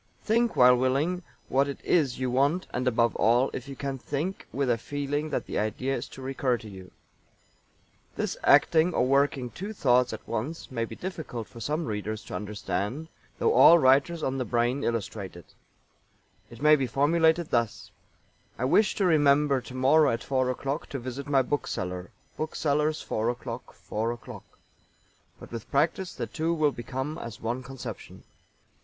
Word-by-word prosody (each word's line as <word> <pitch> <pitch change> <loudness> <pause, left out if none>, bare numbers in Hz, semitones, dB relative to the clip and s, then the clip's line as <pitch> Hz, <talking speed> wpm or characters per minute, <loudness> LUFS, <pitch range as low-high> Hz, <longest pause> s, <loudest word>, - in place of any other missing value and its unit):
Think 230 +1 +2
while 125 0 +7
willing 140 +8 +1 0.3
what 135 +2 +2
it 140 - -5
is 145 -8 +2
you 130 -1 -1
want, 140 +8 +2
and 125 +1 -1
above 115 -1 +2
all, 120 +4 +3
if 130 - -6
you 135 - -7
can, 135 -1 -4
think 150 +9 -4
with 140 -1 -1
a 120 - +3
feeling 145 +4 -3
that - - -2
the - - -2
idea 120 +6 -1
is 120 - -5
to 130 - -10
recur 130 -2 0
to 110 - -11
you. 95 -3 -11 1.3
This - - -2
acting 165 +2 +5
or - - +3
working 135 -2 +1
two 200 +4 -6
thoughts 125 - +3
at - - -8
once 150 +7 -4
may 115 -2 -1
be - - -9
difficult 155 - -6
for 120 - -12
some 150 +8 -2
readers 105 0 -4
to - - -10
understand, 105 - -3 0.3
though 450 - +2
all 170 - +8
writers 140 +4 +3
on 135 0 -1
the - - 0
brain 120 +4 0
illustrate 105 -4 -3
it. 85 - -14 1.0
It 120 +4 -11
may 155 0 +7
be 135 -3 -1
formulated 160 +5 +2
thus: 115 -3 -1 0.7
"I 125 - -1
wish 210 +11 +3
to 195 - +1
remember 145 -4 +4
tomorrow 135 +4 +3
at 115 - -2
four 130 -2 0
o'clock 140 +4 -3
to 140 - -4
visit 130 +2 -6
my 135 -2 +3
bookseller 90 -10 -3 0.3
bookseller's 155 0 0
four 110 +2 -1
o'clock 120 0 -6
four 110 +2 -3
o'clock." 120 -1 -9 0.9
But - - -12
with 115 -2 -7
practice 165 +6 0
the - - -3
two 165 0 -1
will 155 -2 +2
become 135 +5 -5
as 115 -1 -7
one 120 +3 -3
conception. 135 0 -9
135 Hz, 170 wpm, -27 LUFS, 120-150 Hz, 1.3 s, all